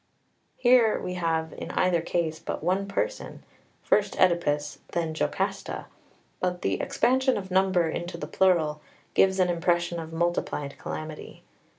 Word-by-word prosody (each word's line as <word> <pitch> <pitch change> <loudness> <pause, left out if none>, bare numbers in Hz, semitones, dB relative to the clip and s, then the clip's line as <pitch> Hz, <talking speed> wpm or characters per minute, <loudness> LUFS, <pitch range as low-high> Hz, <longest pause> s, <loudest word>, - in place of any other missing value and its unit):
Here 245 -3 +5
we 180 - -4
have 165 -2 -1
in - - -7
either 180 -2 +2
case 160 -2 -1
but - - -5
one 190 +3 +1
person, 470 - -3 0.4
first - - +1
Oedipus, 150 -5 +2
then 165 -2 -1
Jocasta; 155 - -2 0.5
but 180 -1 -2
the 95 - 0
expansion 260 +1 +2
of 190 -2 -6
number 185 -2 +3
into 175 +2 -4
the - - -5
plural 160 -5 +2 0.3
gives 190 0 +4
an 180 -1 +3
impression 175 0 +1
of 160 0 -7
multiplied 165 -4 -2
calamity. 155 0 -7
175 Hz, 135 wpm, -27 LUFS, 160-190 Hz, 0.5 s, Here